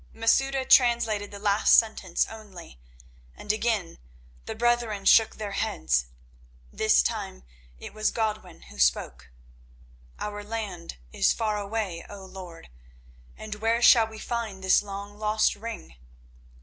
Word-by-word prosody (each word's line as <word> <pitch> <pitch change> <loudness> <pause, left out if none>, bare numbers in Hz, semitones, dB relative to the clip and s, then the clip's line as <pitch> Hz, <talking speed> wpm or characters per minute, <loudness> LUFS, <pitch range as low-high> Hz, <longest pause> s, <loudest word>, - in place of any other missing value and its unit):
Masouda 265 +4 +1
translated 235 -6 +3
the 200 - -9
last 205 0 +4
sentence 205 -6 +1
only, 195 - -12 0.6
and 210 - -2
again 215 -6 -2 0.5
the 220 - -5
brethren 235 -3 0
shook 225 -1 +5
their 210 -2 -6
heads. 65 - -1 0.7
This 60 0 +3
time 60 +1 -4 0.3
it - - -10
was 215 0 0
Godwin 215 - -4
who 65 +2 -14
spoke. 65 +1 0 0.9
"Our 205 0 -5
land 205 - -6 0.2
is - - +3
far 215 -2 -1
away, 200 -4 -4
O 200 -2 -10
lord, 185 - -11 0.7
and 215 -1 -7
where 225 +2 0
shall 230 -2 +7
we 220 0 -11
find 220 -4 -5
this 190 - +4
long 200 +1 -8
lost 215 0 +2
ring? 210 - -9
210 Hz, 130 wpm, -26 LUFS, 190-225 Hz, 0.9 s, shall